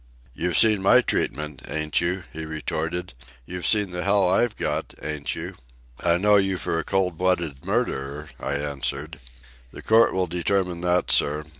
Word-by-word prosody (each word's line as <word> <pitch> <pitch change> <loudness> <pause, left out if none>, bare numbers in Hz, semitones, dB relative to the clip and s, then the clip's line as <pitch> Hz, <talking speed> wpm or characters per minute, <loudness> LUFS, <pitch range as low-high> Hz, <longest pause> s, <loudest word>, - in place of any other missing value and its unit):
"You've 85 +4 -1
seen 110 -3 +5
my 125 +7 +6
treatment, 75 - -2
ain't 75 -1 0
you?" 90 +2 -1
he 80 - -6
retorted. 80 +1 -4 0.3
"You've 90 +3 -3
seen 105 -3 +4
the 90 0 -4
hell 100 -1 +3
I've 105 +5 +2
got, - - -3
ain't 75 -2 -4
you?" - - -5 0.5
"I 85 -1 +3
know 105 +3 +4
you 95 -1 +1
for 80 - -2
a - - -1
cold 95 -4 -1
blooded 85 -6 0
murderer," 75 - -2
I 70 - -3
answered. 70 +2 -4 0.5
"The - - -12
court 115 +1 +5
will 95 -1 +1
determine 90 0 -1
that, 90 0 +1
sir. 75 +1 +2
90 Hz, 165 wpm, -24 LUFS, 75-95 Hz, 0.5 s, my